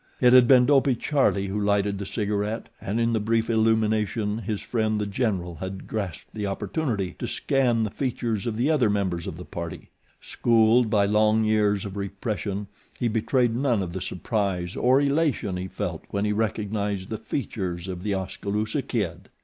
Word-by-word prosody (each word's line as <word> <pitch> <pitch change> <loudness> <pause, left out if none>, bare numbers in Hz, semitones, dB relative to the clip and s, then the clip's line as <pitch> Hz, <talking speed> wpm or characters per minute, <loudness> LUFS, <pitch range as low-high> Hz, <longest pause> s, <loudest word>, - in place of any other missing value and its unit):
It 125 -1 +5
had 125 -2 +8
been 125 -1 +7
Dopey 135 -1 +4
Charlie 125 -7 +1
who 100 +2 -2
lighted 100 -1 +1
the 100 - -5
cigaret 105 +1 -2
and 105 +4 -2
in 115 0 +2
the 110 - +2
brief 115 +2 +1
illumination 110 -1 +1
his 105 -1 -3
friend 110 -2 -1
The 105 - -1
General 95 -5 -2
had 95 +3 -6
grasped 100 -7 -5
the 105 -2 -3
opportunity 100 - -2
to - - -3
scan 125 -4 +1
the 105 - -2
features 120 -5 -2
of 110 -2 -2
the 130 +7 +2
other 130 -8 +3
members 95 -5 -1
of 80 - -5
the 90 - -8
party. 85 -1 -7 0.3
Schooled 115 0 +3
by 105 -2 +3
long 110 +2 +3
years 105 -2 +2
of 100 0 -6
repression 100 0 -3 0.3
he 120 - 0
betrayed 115 +2 +1
none 120 -6 +1
of 85 -2 -6
the 95 - -4
surprise 95 -2 -2
or 130 +2 +4
elation 140 - +1
he 90 +1 -4
felt - - -4
when 100 +1 -1
he 105 - +1
recognized 105 -2 -2
the 110 - -4
features 95 -8 -4
of 90 -2 -5
The 100 0 -1
Oskaloosa 105 +6 -2
Kid. 95 -8 -3
105 Hz, 180 wpm, -25 LUFS, 100-115 Hz, 0.3 s, had